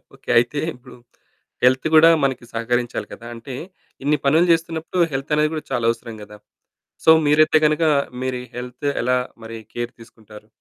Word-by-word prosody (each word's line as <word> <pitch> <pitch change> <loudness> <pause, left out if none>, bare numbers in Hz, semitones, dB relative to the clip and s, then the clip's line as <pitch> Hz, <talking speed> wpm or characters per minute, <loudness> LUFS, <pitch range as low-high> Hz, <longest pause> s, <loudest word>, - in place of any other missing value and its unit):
Okay. - - -15
అయితే 120 +5 +2 0.2
ఇప్పుడు 125 0 -15 0.7
health 130 +4 +3
కూడా 165 +1 +8
మనకి 130 -3 -1
సహకరించాలి 120 +1 -2
కదా! 115 - -12
అంటే, 125 +3 -8 0.5
ఇన్ని 150 +1 +2
పనులు 160 +5 +4
చేస్తున్నప్పుడు 165 +1 -1
హెల్తనేది 150 +3 0
కూడా 155 - -4
చాలా 120 -3 -1
అవసరం 115 -1 -8
గదా! 105 0 -13 0.7
సో, - - +6 0.2
మీరైతే 155 +1 +4
గనక 155 +2 0 0.4
మీరీ 125 -1 -3
హెల్త్ 125 +3 -6 0.2
ఎలా 125 +1 +2 0.3
మరి 115 0 -8 0.2
కేర్ 120 0 -4
తీసుకుంటారు? 110 -2 -15
125 Hz, 145 wpm, -21 LUFS, 120-150 Hz, 0.7 s, కూడా